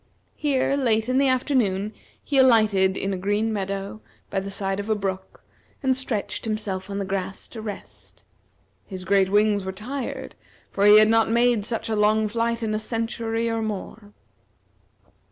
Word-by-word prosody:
Here, 275 -2 +1
late 225 -5 +1
in 255 +1 +2
the 275 - +3
afternoon, 230 -6 +1 0.3
he 280 -2 +1
alighted 215 -7 +4
in 195 0 -2
a - - -2
green 205 +4 0
meadow 200 +1 -4 0.3
by 195 - 0
the 195 +1 -6
side 195 0 -2
of 205 +2 -5
a 220 - +3
brook, 190 -2 -5 0.4
and 260 -1 +3
stretched 250 -5 -2
himself 205 -3 -3
on 200 - -4
the 200 - -2
grass 190 0 -4
to 225 - -8
rest. 210 -2 -9 0.6
His 185 -2 -7
great 195 0 +3
wings 205 0 +3
were 190 - -3
tired, 245 +7 -6 0.4
for 200 +1 +2
he 210 +1 +9
had 215 0 +7
not 225 0 +3
made 235 -2 +2
such 230 0 -3
a 220 - -1
long 215 +1 +3
flight 230 +1 -1
in 215 -1 -1
a 215 - 0
century, 225 0 -2
or 225 0 -1
more. 210 0 -6
215 Hz, 170 wpm, -24 LUFS, 195-230 Hz, 0.6 s, he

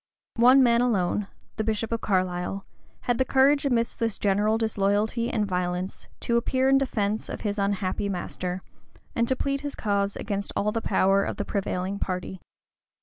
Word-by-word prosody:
One 255 +3 +7
man 235 -1 +4
alone, 205 -4 +1 0.3
the 220 - 0
bishop 220 +1 -1
of 230 - -1
Carlisle, 185 0 -1 0.4
had 245 0 0
the - - +5
courage, 275 +2 +3
amidst 235 -3 0
this 225 -2 -1
general 205 +2 +2
disloyalty 220 +2 0
and 215 -4 0
violence, 180 0 -3
to 235 - +1
appear 260 +2 +1
in 270 0 +5
defence 215 -5 -1
of - - -5
his 205 -1 -2
unhappy 200 0 -1
master, 180 0 -4 0.5
and 235 0 +1
to 260 - +1
plead 275 +1 -1
his 290 -1 -5
cause 200 -2 0
against 200 -2 -3
all 210 +1 +1
the 230 - -2
power 195 -1 +3
of - - -3
the 205 - -2
prevailing 195 0 -2
party. 185 -1 -4
210 Hz, 170 wpm, -26 LUFS, 195-235 Hz, 0.5 s, One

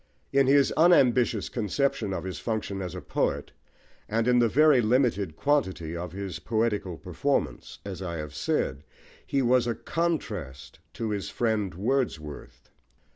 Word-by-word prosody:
In 135 -1 +4
his 140 0 +5
unambitious 125 - +4
conception 120 0 -1
of 95 - -3
his 95 -1 -5
function 105 -4 -3
as 90 -2 -5
a - - -6
poet, - - -1 0.6
and 115 +2 0
in 125 0 +5
the 120 -1 +4
very 150 +1 +5
limited 110 - +1
quantity 95 - 0
of 85 0 -5
his 95 0 -5
poetical 105 -6 -1
performance, - - -2
as 95 -2 -6
I 85 -3 -4
have 75 -1 -6
said, 70 -2 -1 0.4
he 135 -1 +1
was 125 0 +3
a 120 - 0
contrast 95 - -3
to 110 -2 -3
his 100 -2 -3
friend 110 -6 -1
Wordsworth. 100 - -3
110 Hz, 145 wpm, -27 LUFS, 90-130 Hz, 0.6 s, his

